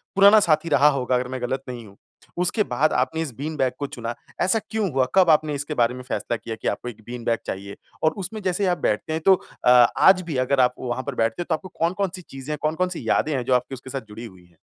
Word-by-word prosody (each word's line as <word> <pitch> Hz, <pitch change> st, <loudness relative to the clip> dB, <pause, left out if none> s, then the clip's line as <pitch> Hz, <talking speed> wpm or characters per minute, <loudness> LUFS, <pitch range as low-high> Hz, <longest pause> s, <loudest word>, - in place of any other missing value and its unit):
पुराना 200 Hz, +2 st, +8 dB
साथी 160 Hz, -3 st, +2 dB
रहा 145 Hz, 0 st, +5 dB
होगा 130 Hz, -2 st, 0 dB
अगर 125 Hz, 0 st, -1 dB
मैं 130 Hz, -1 st, -4 dB
गलत 130 Hz, +2 st, -2 dB
नहीं 120 Hz, -2 st, -7 dB
हूँ, 100 Hz, -1 st, -16 dB, 0.4 s
उसके 180 Hz, +5 st, +1 dB
बाद 155 Hz, -4 st, +1 dB
आपने 145 Hz, +6 st, 0 dB
इस 150 Hz, -5 st, -3 dB
बीन 155 Hz, +4 st, -5 dB
बैग 130 Hz, -1 st, +1 dB
को 145 Hz, -, -2 dB
चुना। 120 Hz, -2 st, -5 dB, 0.3 s
ऐसा 190 Hz, +5 st, +3 dB
क्यों 215 Hz, -4 st, -1 dB
हुआ? 130 Hz, -1 st, +3 dB
कब 185 Hz, -3 st, +5 dB
आपने 155 Hz, -1 st, +3 dB
इसके 145 Hz, +2 st, -4 dB
बारे 120 Hz, -2 st, +2 dB
में 125 Hz, -, -8 dB
फ़ैसला 120 Hz, -2 st, -3 dB
किया 115 Hz, 0 st, -6 dB
कि -, -, -3 dB
आपको 125 Hz, +4 st, -2 dB
1 110 Hz, -2 st, -12 dB
बीन 120 Hz, -1 st, -7 dB
बैग 115 Hz, -1 st, +1 dB
चाहिए 100 Hz, +1 st, -5 dB, 0.3 s
और 155 Hz, -, +4 dB
उसमें 215 Hz, +4 st, -6 dB
जैसे 190 Hz, +1 st, 0 dB
आप 175 Hz, -1 st, +1 dB
बैठते 140 Hz, +4 st, -1 dB
हैं 160 Hz, -, -2 dB
तो 195 Hz, -, +8 dB, 0.3 s
अ, -, -, +6 dB, 0.3 s
आज 190 Hz, -1 st, +6 dB
भी 165 Hz, -6 st, -4 dB
अगर 140 Hz, 0 st, +1 dB
आप 125 Hz, 0 st, +3 dB
वहाँ 125 Hz, +1 st, -3 dB
पर 140 Hz, -3 st, -5 dB
बैठते 115 Hz, +6 st, 0 dB
हो 175 Hz, -, -3 dB
तो 160 Hz, -, +3 dB
आपको 185 Hz, +4 st, -10 dB
कौन-कौन 185 Hz, +3 st, 0 dB
सी 185 Hz, -, -9 dB
चीज़ें 135 Hz, -2 st, -9 dB
हैं, 150 Hz, -, -3 dB
कौन-कौन 160 Hz, +4 st, 0 dB
सी 180 Hz, -, -6 dB
यादें 155 Hz, -, +2 dB
हैं 125 Hz, -, -1 dB
जो 130 Hz, -, +1 dB
आपकी 125 Hz, +2 st, -1 dB
उसके 130 Hz, +1 st, -12 dB
साथ 135 Hz, -1 st, -4 dB
जुड़ी 110 Hz, +3 st, -8 dB
हुई 95 Hz, -5 st, -14 dB
हैं? 85 Hz, -2 st, -27 dB
140 Hz, 270 wpm, -23 LUFS, 125-170 Hz, 0.4 s, पुराना